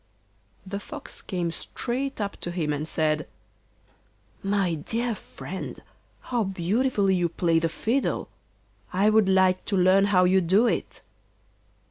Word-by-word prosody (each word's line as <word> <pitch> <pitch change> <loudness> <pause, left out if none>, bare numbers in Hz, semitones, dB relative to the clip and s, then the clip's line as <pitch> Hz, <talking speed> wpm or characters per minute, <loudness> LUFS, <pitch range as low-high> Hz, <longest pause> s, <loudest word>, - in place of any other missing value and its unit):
The 200 +1 -4
Fox 290 +6 -8
came 175 -3 -2
straight 260 +9 -4
up 200 -1 -2
to - - -5
him 165 -4 -1
and 150 +2 -3
said: 155 -1 0 1.1
'My 195 -3 +1
dear 230 +10 -1
friend, - - -7 0.4
how 240 -3 -1
beautifully 195 +3 +1
you 175 -2 +1
play 165 -1 +2
the 165 0 0
fiddle; 240 +10 -1 0.6
I 200 +4 +3
would 215 -3 +4
like 185 -1 +3
to 200 - 0
learn 185 +2 +5
how 190 -3 +4
you 185 +1 +4
do 190 +7 +4
it. - - -2
190 Hz, 135 wpm, -26 LUFS, 175-215 Hz, 1.1 s, learn